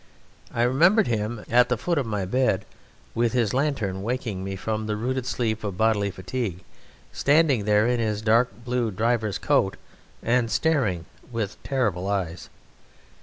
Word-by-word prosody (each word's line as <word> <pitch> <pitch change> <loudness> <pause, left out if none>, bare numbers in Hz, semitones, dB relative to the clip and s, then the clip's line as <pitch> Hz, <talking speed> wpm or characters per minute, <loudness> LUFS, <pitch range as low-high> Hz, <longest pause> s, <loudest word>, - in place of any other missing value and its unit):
I 115 - 0
remember 170 - +4
him 110 -1 -2
at 125 +1 +4
the 125 - +1
foot 170 +5 0
of 130 - -2
my 105 -3 -2
bed 105 -2 +1 0.5
with 120 0 +1
his 120 -5 +1
lantern 125 -9 -1
waking 110 -4 -3
me 95 0 -4
from 110 +3 -3
the 105 - -1
rooted 130 +3 -2
sleep 110 -4 -1
of 100 -3 -4
bodily 110 -2 +2
fatigue, 95 0 -4 0.5
standing 145 -7 +3
there 105 0 +4
in 120 0 +1
his 110 -2 -1
dark 115 +3 +4 0.2
blue 120 -2 0
driver's 110 0 0
coat - - +1 0.5
and 115 0 +2
staring 115 - +1 0.3
with 110 -4 -4
terrible 105 -10 -1
eyes. 95 -4 -3
115 Hz, 155 wpm, -25 LUFS, 100-125 Hz, 0.5 s, remember